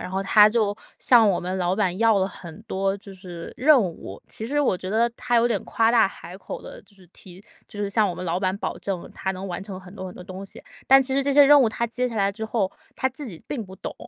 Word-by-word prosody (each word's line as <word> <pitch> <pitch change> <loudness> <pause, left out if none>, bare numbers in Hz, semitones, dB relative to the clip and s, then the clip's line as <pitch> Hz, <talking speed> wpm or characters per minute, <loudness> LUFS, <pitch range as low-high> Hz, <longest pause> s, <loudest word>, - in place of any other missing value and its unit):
然 - - -6
后 190 +1 -2
他 210 +2 +6
就 215 -2 +1 0.2
向 230 -4 +5
我 185 - +1
们 185 +2 -3
老 180 0 0
板 185 -4 0
要 225 -2 +4
了 190 - +1
很 170 -4 -11
多， 195 +1 -1
就 200 0 -12
是 180 -3 -9
任 280 +1 +5
务， 165 - -6
其 220 - -6
实 290 +3 0
我 255 -9 +2
觉 185 +1 -7
得， 230 +3 +2
他 245 - 0
有 235 +1 +4
点 215 -5 -1
夸 225 0 +2
大 235 -4 +5
海 180 -1 -11
口 - - -7
的 - - -10
就 200 +1 -21
是 185 -2 -18
提 180 0 -14 0.3
就 205 - -10
是 200 -1 -2
向 210 0 +2
我 180 - -4
们 185 - -6
老 175 +1 -1
板 190 0 0
保 - - -4
证 190 -3 -4
他 190 - -3
能 190 +1 -7
完 180 0 -5
成 195 -2 -8
很 180 0 -14
多 190 -2 -7
很 180 - -9
多 - - -10
东 190 0 -8
西。 195 - -12 0.2
但 270 0 +7
其 265 - -3
实 275 - +2
这 280 +1 0
些 290 +1 +7
任 290 0 +7
务 240 - +4
他 235 +2 -2
接 250 +2 -2
下 230 - -7
来 200 -1 +2
之 220 +2 -6
后， 215 -4 -1 0.2
他 260 - 0
自 265 +3 -8
己 175 -9 -10
并 245 -7 -4
不 190 -1 -12
懂， - - -7
200 Hz, 305 characters per minute, -24 LUFS, 185-235 Hz, 0.3 s, 但